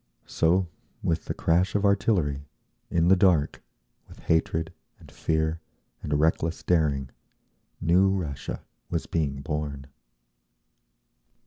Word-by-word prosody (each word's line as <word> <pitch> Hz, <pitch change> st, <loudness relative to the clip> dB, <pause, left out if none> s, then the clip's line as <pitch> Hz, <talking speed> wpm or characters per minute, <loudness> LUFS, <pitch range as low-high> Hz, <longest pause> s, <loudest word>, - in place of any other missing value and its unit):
So, 90 Hz, +3 st, +2 dB, 0.4 s
with 80 Hz, -, 0 dB
the -, -, -3 dB
crash 90 Hz, +5 st, +1 dB
of 105 Hz, 0 st, +2 dB
artillery, 85 Hz, -9 st, +1 dB, 0.4 s
in 85 Hz, 0 st, +2 dB
the 95 Hz, -, +7 dB
dark, 90 Hz, -6 st, +2 dB, 0.5 s
with -, -, -15 dB
hatred, 80 Hz, 0 st, 0 dB, 0.2 s
and -, -, -16 dB
fear, 80 Hz, 0 st, -1 dB, 0.4 s
and 75 Hz, -1 st, -1 dB
reckless 80 Hz, +1 st, +1 dB
daring, 70 Hz, -7 st, +1 dB, 0.7 s
new 90 Hz, +4 st, +4 dB
Russia 85 Hz, -8 st, -3 dB, 0.3 s
was -, -, -2 dB
being 70 Hz, -4 st, -2 dB
born. 75 Hz, -3 st, -4 dB
80 Hz, 110 wpm, -26 LUFS, 75-90 Hz, 0.7 s, the